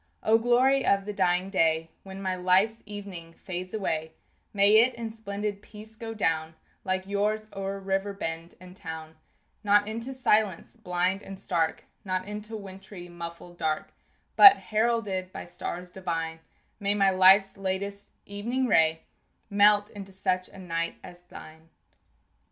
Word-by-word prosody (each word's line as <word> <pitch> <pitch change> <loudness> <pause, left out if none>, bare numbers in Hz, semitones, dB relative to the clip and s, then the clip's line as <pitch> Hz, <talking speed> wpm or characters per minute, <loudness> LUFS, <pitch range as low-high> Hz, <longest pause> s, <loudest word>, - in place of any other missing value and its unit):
O 225 +1 +4
glory 255 +3 +3
of 195 0 +2
the 210 - -4
dying 185 0 +1
day, 165 -3 +1
When 195 0 -9
my 185 -1 -1
life's 185 +5 +2
evening 195 -5 -9
fades 185 +1 -7
away, 160 -6 -3 0.4
May 205 +1 +5
it 240 +2 +4
in 230 -1 -5
splendid 205 -2 -5
peace 215 +1 -13
go 225 0 -7
down 160 -5 -1 0.3
Like 185 0 -1
yours 210 +2 -1
o'er 195 0 -4
river 195 +1 -2
bend 165 -3 -5
and 180 0 -13
town 160 -4 -7 0.5
Not 205 0 +4
into 230 +5 -5
silence 215 -8 +1
blind 185 -2 -1
and 195 -1 -9
stark, 165 -5 +1 0.2
Not 185 -1 -3
into 210 +2 -4
wintry 190 -2 -10
muffled 170 0 -9
dark 155 -1 -2 0.4
But, 400 -1 +10
heralded 215 -4 -1
by - - -7
stars 175 +1 -6
divine, 165 -3 -4 0.4
May 205 0 +2
my 195 -1 +3
life's 190 +1 +6
latest 200 +1 -4 0.2
evening 235 +6 -2
ray 160 -7 +3 0.5
Melt 205 0 +5
into 195 -2 -9
such 185 -1 -1
a - - -15
night 170 -2 -3
as 175 0 -12
thine. 160 -2 -14
195 Hz, 145 wpm, -27 LUFS, 175-210 Hz, 0.5 s, But